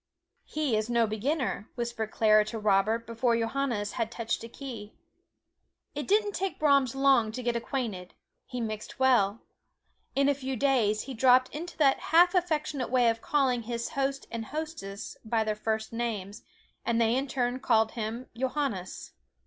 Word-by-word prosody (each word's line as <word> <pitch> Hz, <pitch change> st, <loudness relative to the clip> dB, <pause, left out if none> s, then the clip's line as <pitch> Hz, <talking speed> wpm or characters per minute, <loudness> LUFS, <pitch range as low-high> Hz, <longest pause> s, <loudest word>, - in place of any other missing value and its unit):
"He 295 Hz, -6 st, -1 dB
is 215 Hz, +1 st, -1 dB
no 235 Hz, -1 st, +3 dB
beginner," 230 Hz, +1 st, -2 dB
whispered 235 Hz, -3 st, -3 dB
Clara 215 Hz, -1 st, +4 dB
to 225 Hz, +2 st, -5 dB
Robert 215 Hz, +2 st, +2 dB
before 230 Hz, +1 st, +1 dB
Johannes 230 Hz, -3 st, -1 dB
had 230 Hz, -2 st, -2 dB
touched 230 Hz, -1 st, -3 dB
a 230 Hz, -, -8 dB
key. 230 Hz, -5 st, -8 dB, 1.0 s
It -, -, -4 dB
didn't 415 Hz, +1 st, +3 dB
take 390 Hz, -1 st, -3 dB
Brahms 280 Hz, -4 st, +3 dB
long 270 Hz, -5 st, +4 dB
to 250 Hz, +2 st, -5 dB
get 240 Hz, 0 st, 0 dB
acquainted 230 Hz, -7 st, -4 dB, 0.3 s
he 250 Hz, -, -5 dB
mixed 215 Hz, -2 st, -5 dB
well. 235 Hz, -5 st, +3 dB, 0.7 s
In 275 Hz, +1 st, +3 dB
a 285 Hz, -, +4 dB
few 265 Hz, -1 st, -4 dB
days 230 Hz, -5 st, +2 dB
he 270 Hz, -, -7 dB
dropped 255 Hz, +1 st, +5 dB
into 340 Hz, +4 st, -6 dB
that 275 Hz, -3 st, +4 dB
half 350 Hz, +2 st, +4 dB
affectionate 310 Hz, -7 st, 0 dB
way 245 Hz, -1 st, +4 dB
of 225 Hz, 0 st, -2 dB
calling 265 Hz, -5 st, +1 dB
his 235 Hz, +1 st, -4 dB
host 275 Hz, -2 st, -2 dB
and 225 Hz, -1 st, -4 dB
hostess 300 Hz, -9 st, -6 dB
by 225 Hz, 0 st, +1 dB
their 215 Hz, 0 st, 0 dB
first 220 Hz, +1 st, -3 dB
names, 220 Hz, -4 st, -3 dB, 0.4 s
and 235 Hz, 0 st, +1 dB
they 230 Hz, 0 st, +3 dB
in 270 Hz, +2 st, 0 dB
turn 250 Hz, -1 st, -1 dB
called 225 Hz, -4 st, +3 dB
him 230 Hz, +2 st, -4 dB
"Johannes." 255 Hz, -7 st, -3 dB
240 Hz, 165 wpm, -29 LUFS, 220-275 Hz, 1.0 s, dropped